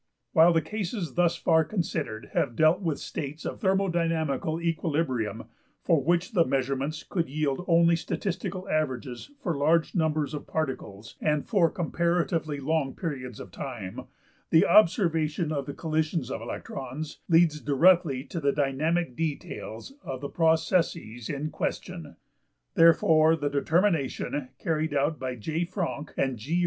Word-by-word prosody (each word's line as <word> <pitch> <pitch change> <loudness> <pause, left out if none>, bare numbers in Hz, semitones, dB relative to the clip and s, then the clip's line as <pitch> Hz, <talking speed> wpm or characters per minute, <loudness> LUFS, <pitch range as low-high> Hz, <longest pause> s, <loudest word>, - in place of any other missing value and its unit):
While 165 +2 +7
the 165 -2 +2
cases 200 - -4
thus 175 -1 +2
far 160 -1 +3
considered 150 - -3
have 120 - 0
dealt 155 - +4
with 165 -6 -1
states 150 +2 -6
of - - -4
thermodynamical 165 - 0
equilibrium, 150 - -1 0.4
for 160 -5 +3
which 175 +4 +1
the 180 -6 +4
measurements 135 +2 -1
could 170 -6 -2
yield 150 +2 -1
only 170 0 +5
statistical 185 +2 -3
averages 130 - -2
for 170 -4 0
large 160 +3 +2
numbers 155 -4 0
of 150 - -6
particles 115 -9 -4
and 150 -1 0
for 185 -7 +3
comparatively 170 -3 -1
long 140 -1 -1
periods 130 - -5
of 100 - -9
time, 110 -3 -6 0.4
the 160 - +5
observation 165 -4 +3
of 140 -3 -2
the 140 - -4
collisions 155 -4 -1
of - - -4
electrons 135 +3 -6
leads 165 -3 +4
directly 150 -2 +3
to 165 +4 -5
the 140 -2 +2
dynamic 145 +2 0
details 150 - -5
of 130 -1 -5
the 140 +1 -5
processes 160 - +1
in 150 +1 -3
question. 165 0 -4 0.6
Therefore 160 -1 +5
the 145 -2 -2
determination, 145 -3 0
carried 155 -2 -1
out 145 +1 +1
by 130 -1 -3
J.~Franck 160 - -3
and 130 -4 0
G. 155 +11 -1
155 Hz, 135 wpm, -27 LUFS, 140-170 Hz, 0.6 s, While